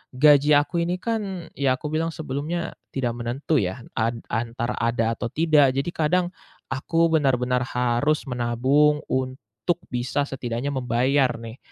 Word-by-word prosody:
gaji 145 +2 +6
aku 170 +4 +1
ini 175 +2 -1
kan 200 -6 -3
ya 135 -2 +2
aku 150 - -4
bilang 165 +1 0
sebelumnya 155 +3 -4 0.2
tidak 125 -3 -1
menentu 120 +6 -2
ya, 95 +6 -3
ant 115 +1 -1
antara 120 +1 -2
ada 115 -1 +1
atau 120 - -3
tidak. 155 -4 +4
Jadi 140 +5 -1
kadang 175 +3 +2 0.4
aku 165 +5 +1
benar-benar 125 -4 +2
harus 125 +5 +1
menabung 130 +5 +2
untuk 130 - -2
bisa 125 +3 -1
setidaknya 125 0 -3
membayar 130 +1 +2
nih. 115 +1 -8
135 Hz, 140 wpm, -24 LUFS, 120-155 Hz, 0.4 s, gaji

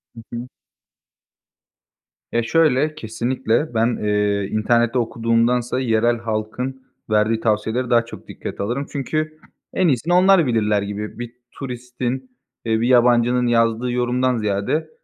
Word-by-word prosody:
Hı 115 - -9
hı. 120 +2 -6 1.8
Ya 120 0 +1
şöyle: 155 +2 +2
Kesinlikle 120 +3 -1
ben, 115 +1 +1
eee, 105 -1 +1
internette 120 +3 +2
okuduğumdansa 115 +2 +1
yerel 120 -1 +2
halkın 115 +4 -4 0.3
verdiği 110 +1 +2
tavsiyelere 110 +3 0
daha 115 -1 +3
çok 115 - -11
dikkate - - -6
alırım. 125 +7 -2
Çünkü 155 +3 -3 0.4
en 185 - +2
iyisini 150 +5 +1
onlar 185 -2 +5
bilirler 105 -4 +1
gibi 105 +3 -5
bir 120 0 -6 0.2
turistin, 125 0 -5 0.3
eee, 110 -1 +1
bir 120 - +1
yabancının 125 0 +4
yazdığı 115 +1 +1
yorumdan 125 0 +1
ziyade, 105 +8 -1
120 Hz, 125 wpm, -21 LUFS, 110-130 Hz, 1.8 s, onlar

